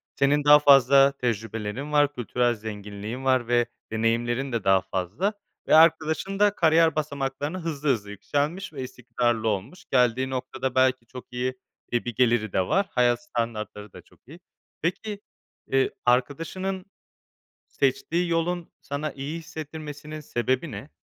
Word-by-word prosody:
Senin 140 +1 +2
daha 150 0 +8
fazla 140 -1 +6
tecrübelerin 115 +1 -3
var. 145 -1 +3
Kültürel 120 -1 0
zenginliğin 105 +3 -7
var 130 -3 +2
ve 120 -1 +3 0.3
deneyimlerin 120 +4 0
de 115 -3 -2
daha 95 -1 +4
fazla 100 - -2 0.3
ve - - +5
arkadaşın 160 +4 +3
da 205 0 +4
kariyer 160 -1 +4
basamaklarını 145 +2 -3
hızlı 155 -3 -2
hızlı 105 -5 0
yükselmiş 150 - -2
ve 135 - -6
istikrarlı 120 -2 -1
olmuş 115 - -3
geldiği 125 0 +2
noktada 130 0 -3
belki 130 -2 +3
çok 125 0 -12
iyi 125 +1 -2 0.4
bir 120 -1 -1
geliri 115 -4 +2
de 95 - +3
var 195 +1 +2
hayat 120 -1 +2
standartları 110 -4 -4
da 90 - -11
çok - - -25
iyi. 165 +5 -12 0.4
Peki, 200 +4 -2 0.5
eee, 135 0 +3 0.2
arkadaşının 165 +10 0 0.8
seçtiği 165 +6 0
yolun 170 +1 -1
sana 145 +2 -4
iyi 140 +4 -5
hissettirmesinin 155 -1 -8
sebebi 130 +2 -1
ne? 145 - -8
135 Hz, 135 wpm, -25 LUFS, 120-155 Hz, 0.8 s, daha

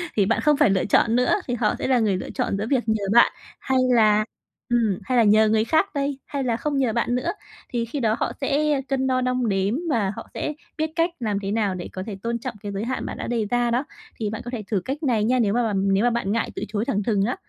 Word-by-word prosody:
Thì 205 - +3
bạn 220 - +1
không 300 -1 +3
phải 295 -6 +4
lựa 195 -1 +1
chọn 225 +3 +3
nữa, 250 +1 +3
thì 245 - -1
họ 215 -3 +1
sẽ - - -2
là 260 -2 +3
người 210 -4 +1
lựa - - -6
chọn 195 - -1
giữa 210 +2 -3
việc 260 -4 +2
nhờ 220 -2 +1
bạn 235 - +6 0.3
hay 265 -1 0 0.2
là, 215 -2 +4 0.4
ừm, 225 -6 +1
hay 255 -1 0
là 235 - +6
nhờ 215 +1 +5
người 220 0 +3
khác 315 +9 +1
đây, 280 -1 -1
hay 280 -2 -3
là 235 -3 0
không 290 +3 -2
nhờ 255 -5 +1
bạn 240 +1 0
nữa, 250 - -1 0.4
thì 235 -1 -1
khi 250 +5 -4
đó 220 -3 +2
họ - - 0
sẽ 290 +1 +1
cân 265 -1 0
đo 255 -1 +1
đong 250 -2 0
đếm 195 +2 +1
và 220 -9 +1
họ - - -8
sẽ 300 - -3 0.2
biết 315 0 -1
cách 335 0 +2
làm 210 -4 -1
thế 195 -1 -4
nào 205 -3 0
để 175 - -6
có 185 - -4
thể 210 -2 -5
tôn 235 0 -1
trọng 245 0 -5
cái 205 - -4
giới 200 +2 -3
hạn 255 +2 -3
bạn - - -5
đã - - -5
đề 230 -3 0
ra 245 -1 +2
đó. 250 +5 0 0.3
Thì 215 -2 -2
bạn 220 - -5
có 240 - -5
thể 235 -4 -4
thử 205 - +2
cách 285 +4 -4
này 235 -7 +2
nha, 250 +4 +2
nếu 205 -4 +2
mà 240 +1 +2
bằm 195 -3 +1
nếu 195 +3 +2
mà 245 - +4
bạn 235 -4 -1
ngại 230 +2 -1
từ - - -4
chối 210 +1 -2
thẳng 205 -2 -1
thừng 205 -2 +1
á. 245 - -1
235 Hz, 285 wpm, -23 LUFS, 210-255 Hz, 0.4 s, bạn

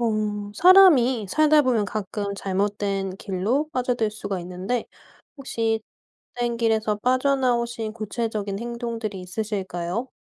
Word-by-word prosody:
어 210 -3 -1
사람이 285 - +6
살다 305 +4 +4
보면 245 -6 +2
가끔 200 0 -4
잘못된 195 -1 -2
길로 210 +11 -1
빠져들 245 -4 0
수가 205 -2 -4
있는데 185 +7 -3 0.5
혹시 225 -5 -1 0.6
잘못된 240 -1 -1
길에서 220 -2 +1
빠져나오신 245 -2 0
구체적인 215 -2 -3
행동들이 235 -4 -4
있으실까요? 190 +2 -4
220 Hz, 290 characters per minute, -24 LUFS, 200-245 Hz, 0.6 s, 사람이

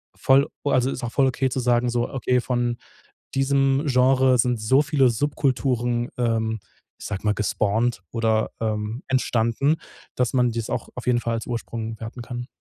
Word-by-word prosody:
voll, 135 +2 +4 0.2
o 145 - +1
also, 130 +1 +2
ist 125 - -6
auch 115 - -4
voll 135 -1 +3
okay 130 +1 0
zu 130 - -2
sagen, 120 0 +2
so: 120 0 -1
„Okay, 125 -1 0
von 120 -1 -1 0.6
diesem 135 +1 +2
Genre 130 0 +4
sind 120 0 +2
so 130 +6 +4
viele 140 -3 +3
Subkulturen, 120 -2 0
ähm, 110 -2 0 0.4
ich - - -9
sage 100 -2 -4
mal, 105 - +3
gespawnt 105 +1 0
oder, 110 -1 +1
ähm, 110 +2 -2
entstanden, 130 +2 +1 0.4
dass 125 -2 0
man 125 -2 +3
dies 115 -1 -4
auch - - -3
auf 125 - -7
jeden 120 -1 +3
Fall 115 -1 -2
als 115 - -4
Ursprung 115 -2 -4
werten 115 +2 -7
kann." 120 +1 -6
120 Hz, 175 wpm, -23 LUFS, 115-130 Hz, 0.6 s, voll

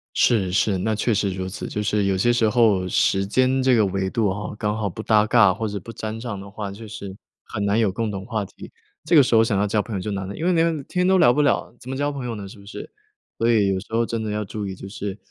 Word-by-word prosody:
是 100 -7 +3
是， 95 +1 +2
那 110 +4 0
确 110 +2 0
实 100 -1 +1
如 95 0 -4
此， 95 - -6
就 105 - -3
是 105 -1 +1
有 95 -1 +1
些 120 +6 +3
时 115 -2 +2
候， 105 -5 +3
时 95 +2 +2
间 130 +5 +2
这 130 -1 +4
个 110 -2 +4
维 95 0 -1
度 110 +1 0
啊， 100 +1 -4
刚 105 -1 -1
好 110 -2 -2
不 110 +5 -7
搭 105 -1 +4
嘎 110 -4 +5
或 110 +4 -3
者 100 -1 -4
不 115 - -10
沾 110 0 -5
上 115 -4 -5
的 100 +1 -10
话， 100 0 -6
就 110 +2 -10
是 100 -2 -8 0.3
很 105 - -4
难 100 +2 +2
有 110 -4 +2
共 110 +3 -2
同 95 -2 -5
话 110 -2 -2
题， 100 - -11 0.3
这 - - +2
个 150 - +9
时 125 -3 +2
候 110 - +6
想 110 -3 0
要 105 - +1
交 105 +1 +1
朋 110 0 -6
友 95 - -2
就 105 - -4
难 95 -1 -3
了。 100 - -6
因 160 - -4
为 180 - +3
连 165 -3 +1
天 180 0 0
都 190 0 +4
聊 160 - +6
不 150 - +2
了， 145 - 0
怎 125 - -11
么 135 - -3
交 145 +2 -1
朋 140 -3 -6
友 120 - -3
呢， 100 -2 -7
是 95 - -12
不 100 - -15
是？ 100 - -9 0.5
所 115 - +1
以 105 -4 +3
有 95 -1 0
时 100 - -12
候 115 +1 +1
真 115 -1 -3
的 110 - -3
要 105 0 -2
注 105 0 -5
意， 95 - -4
就 95 - -9
是 100 -1 -5
105 Hz, 320 characters per minute, -23 LUFS, 100-115 Hz, 0.5 s, 个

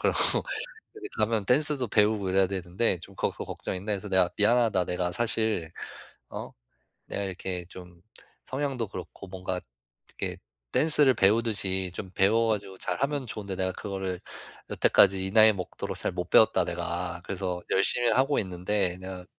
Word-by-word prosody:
그러고 - - +2 0.8
이렇게 410 -2 -7
가면 110 -2 +1
댄스도 140 +2 +1
배우고 105 -2 +2
이래야 95 0 +3
되는데 95 +1 -1
좀 100 - -12
거 - - 0
걱정인데 95 +3 -5
그래서 100 +1 -5
내가 95 -2 +3
"미안하다. 110 -3 +3
내가 90 0 -2
사실 110 -4 -1 0.6
어 - - -7 0.6
내가 100 - -3
이렇게 90 -2 -3
좀 90 -1 -13 0.4
성향도 130 -4 -3
그렇고 95 +1 -9
뭔가 95 -1 -4 0.6
이렇게 - - -1 0.3
댄스를 150 -4 +4
배우듯이 100 -3 +2
좀 95 - -7
배워 110 +4 +3
가지고 100 -3 -3
잘하면 140 0 -2
좋은데 100 -3 -6
내가 95 0 -1
그거를 95 -2 -5 0.5
여태까지 95 -1 +4
이 - - -3
나이 110 +1 +8
먹도록 90 -4 -6
잘 - - -2
못 - - -5
배웠다, - - +5
내가. 85 0 -4
그래서 90 -2 -4
열심히는 120 +5 +4
하고 135 +3 +2
있는데 90 0 -2
내가 95 -1 -7
95 Hz, 345 characters per minute, -27 LUFS, 95-110 Hz, 0.8 s, 나이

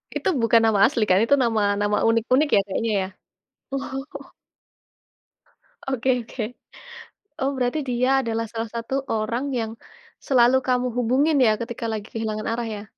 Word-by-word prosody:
Itu - - 0
bukan 230 0 +4
nama 220 -3 +3
asli 240 -2 0
kan? 185 - +5
Itu 280 - +4
nama 225 -3 +1 0.2
nama 205 0 +1
unik-unik 250 +6 +2
ya - - +6
kayaknya? 220 +2 -1 0.8
Oh. 275 +1 -6 1.6
Oke 265 -1 -1 0.2
oke. 235 - -5 1.0
Oh 270 +1 +1
berarti 250 +4 0
dia 250 +1 +1
adalah 230 -1 -2
salah 225 0 -5
satu 235 +4 -3
orang 225 +4 -1
yang 230 -4 -2 0.6
selalu 250 -1 +5
kamu 250 -1 +1
hubungin 260 +6 +2
ya 215 -3 +3
ketika 235 0 -5
lagi 215 -1 -5
kehilangan 215 -1 -3
arah 230 +1 -2
ya? 205 - -8
235 Hz, 145 wpm, -23 LUFS, 225-260 Hz, 1.6 s, ya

